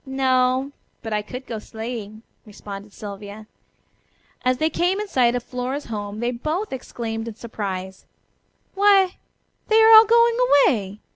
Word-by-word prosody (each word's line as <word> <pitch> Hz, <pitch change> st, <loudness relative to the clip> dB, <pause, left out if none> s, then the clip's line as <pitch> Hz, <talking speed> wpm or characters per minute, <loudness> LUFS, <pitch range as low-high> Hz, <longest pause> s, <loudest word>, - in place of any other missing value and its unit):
"No, 260 Hz, 0 st, +1 dB, 0.3 s
but 225 Hz, -, -4 dB
I 210 Hz, -, 0 dB
could 250 Hz, +5 st, -9 dB
go 225 Hz, -3 st, -5 dB
sleighing," 220 Hz, -1 st, -7 dB, 0.2 s
responded 205 Hz, -1 st, -10 dB
Sylvia. 205 Hz, +1 st, -9 dB, 1.0 s
As 255 Hz, -1 st, +2 dB
they 315 Hz, +4 st, 0 dB
came 360 Hz, +3 st, 0 dB
in 420 Hz, -, -4 dB
sight 245 Hz, -8 st, +2 dB
of 245 Hz, -, -3 dB
Flora's 255 Hz, +4 st, -4 dB
home 205 Hz, +1 st, -5 dB
they 240 Hz, +1 st, 0 dB
both 310 Hz, -, -3 dB
exclaimed 230 Hz, -3 st, -5 dB
in 225 Hz, -, -7 dB
surprise: 190 Hz, -5 st, -6 dB, 0.7 s
"Why, 390 Hz, -2 st, +4 dB, 0.5 s
they 440 Hz, 0 st, +4 dB
are 445 Hz, 0 st, +7 dB
all 440 Hz, 0 st, +10 dB
going 465 Hz, +1 st, +4 dB, 0.3 s
away! 205 Hz, -3 st, -1 dB
245 Hz, 145 wpm, -22 LUFS, 210-300 Hz, 1.0 s, all